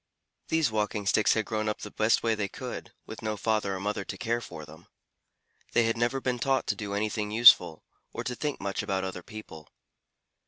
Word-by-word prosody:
These 160 -7 +2
Walking 105 -1 -1
Sticks 105 +1 +3
had 110 -1 0
grown 110 -1 -1
up 105 - -4
the 105 - -7
best 110 +1 +2
way 115 -1 +2
they 105 -2 -1
could, - - -7
with - - -9
no 110 -1 -2
father 105 -2 0
or - - -5
mother 100 +1 -2
to - - -7
care 120 0 -1
for 75 -8 -9
them. 80 +3 -15 0.9
They 120 - +4
had 115 0 +1
never 120 +3 0
been 125 -2 -2
taught 135 0 +1
to - - +2
do 100 -3 -4
anything 105 0 -1
useful, 105 -7 +6 0.3
or - - -5
to 125 - -3
think 145 +3 -3
much 100 0 -2
about 95 -2 -1
other 95 -1 -4
people. 90 -6 -11
110 Hz, 205 wpm, -28 LUFS, 100-115 Hz, 0.9 s, useful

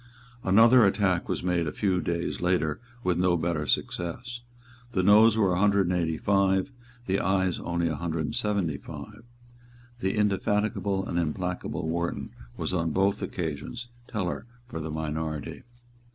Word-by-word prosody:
Another 115 +5 +6
attack 95 -3 +2
was - - -2
made 90 -2 +1
a - - -1
few 95 -1 0
days 85 -1 -2
later 85 -4 +1 0.2
with 90 -1 +1
no 90 -1 +3
better 80 -3 -1
success. 120 +8 -2 0.5
The 95 -4 +1
Noes 110 +3 +6
were 100 -4 +3
a 90 - 0
hundred 100 -2 +3
and - - +1
eighty 80 -2 0
five, 100 +3 +2 0.3
the 95 +1 +1
Ayes 95 -1 +1
only 85 -1 -1
a 80 - -1
hundred 80 +1 -2
and - - -4
seventy 100 -8 0
five. 115 - -10 0.8
The 95 0 -1
indefatigable 105 -1 0
and 85 - -1
implacable 90 0 -2
Wharton 85 +1 -2 0.3
was - - -2
on 85 -2 +1
both 95 +5 +1
occasions 90 - -4 0.2
tellers 100 +1 -3 0.2
for 80 - -6
the 80 0 -4
minority. 80 0 -4
90 Hz, 150 wpm, -27 LUFS, 85-100 Hz, 0.8 s, Another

